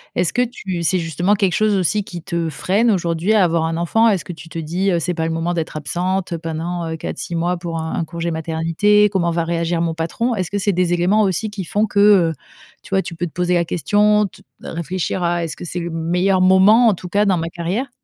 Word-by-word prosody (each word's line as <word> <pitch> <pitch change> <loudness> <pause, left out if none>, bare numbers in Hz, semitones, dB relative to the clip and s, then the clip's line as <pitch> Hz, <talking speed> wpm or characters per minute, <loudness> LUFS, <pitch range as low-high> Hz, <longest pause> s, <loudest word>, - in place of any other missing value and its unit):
Est-ce 175 - 0
que 245 - +2
tu 195 -8 -3
c'est 185 +3 +1
justement 175 +4 0
quelque 195 -3 +1
chose 215 -1 +2
aussi 195 +3 +1
qui 175 -3 -9
te 170 -1 -2
freine 200 - +1
aujourd'hui 175 0 +1
à 210 - +5
avoir 165 -2 +1
un 165 0 -2
enfant? 225 +7 +2
Est-ce 195 -4 0
que 180 - -6
tu 165 0 -12
te 165 - -8
dis, 175 +5 -1
heu: 170 - +1
«C'est 180 +2 -2
pas 160 -1 -2
le 165 - -1
moment 165 +2 -1
d'être 165 -2 -3
absente, 180 +4 -2
heu, 165 - -3
pendant, 165 +1 -4
heu, 160 - -3
4-6 170 - -5
mois 175 +2 0
pour 170 -1 -5
un 160 0 -4
un - - 0
congé 170 +1 -4
maternité, 165 +6 +2
comment 175 -3 +1
va 170 0 0
réagir 170 0 -1
mon 165 -1 0
patron?» 170 +10 -2
Est-ce 185 -4 -2
que 205 - -2
c'est 200 0 0
des 180 0 +1
éléments 180 +5 +2
aussi 205 +2 0
qui 200 -3 -5
font 210 +6 +1
que, 205 -1 -1
heu, 195 -6 +5 0.5
tu - - -15
vois, 195 0 +2
tu - - -7
peux 175 +1 -3
te - - -12
poser 180 +1 0
la 170 -1 +2
question, 210 +5 +2
te 195 - -11 0.2
réfléchir 180 +2 -3
à 175 0 0
est-ce 165 - -4
que - - -8
c'est 175 +1 -4
le 170 0 -4
meilleur 180 +4 +1
moment 190 +6 +6
en 215 - +5
tout 180 +1 -9
cas, 205 +2 +2
dans 190 -3 +2
ma 165 0 -3
carrière? 180 +11 -3
175 Hz, 255 wpm, -19 LUFS, 165-195 Hz, 0.5 s, moment